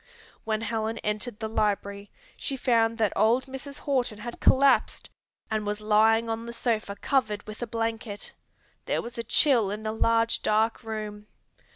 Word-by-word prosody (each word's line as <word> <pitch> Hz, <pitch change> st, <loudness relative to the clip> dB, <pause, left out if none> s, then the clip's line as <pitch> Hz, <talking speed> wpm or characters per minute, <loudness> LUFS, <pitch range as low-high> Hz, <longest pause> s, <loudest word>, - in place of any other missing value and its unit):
When 220 Hz, -1 st, -1 dB
Helen 225 Hz, 0 st, -2 dB
entered 210 Hz, +1 st, -3 dB
the 220 Hz, -, -2 dB
library, 200 Hz, -2 st, -1 dB, 0.3 s
she 270 Hz, -, -3 dB
found 230 Hz, -3 st, +2 dB
that 220 Hz, -3 st, +1 dB
old 225 Hz, +5 st, +3 dB
Mrs. 275 Hz, +2 st, -8 dB
Horton 255 Hz, -6 st, -1 dB
had 235 Hz, +3 st, -7 dB
collapsed, 275 Hz, +1 st, +3 dB, 0.4 s
and 215 Hz, -1 st, 0 dB
was 210 Hz, 0 st, -2 dB
lying 220 Hz, +2 st, +4 dB
on 225 Hz, +1 st, -3 dB
the 235 Hz, -, -6 dB
sofa 220 Hz, -4 st, -1 dB
covered 215 Hz, -5 st, 0 dB
with 215 Hz, +2 st, -9 dB
a 240 Hz, -, -2 dB
blanket. 225 Hz, -2 st, -3 dB, 0.5 s
There -, -, -1 dB
was 235 Hz, 0 st, -8 dB
a -, -, -2 dB
chill 235 Hz, -3 st, +3 dB
in 210 Hz, +2 st, -5 dB
the 215 Hz, -, -1 dB
large, 230 Hz, +1 st, +2 dB
dark 220 Hz, +1 st, +1 dB
room. 215 Hz, -2 st, -6 dB
225 Hz, 165 wpm, -27 LUFS, 215-235 Hz, 0.5 s, lying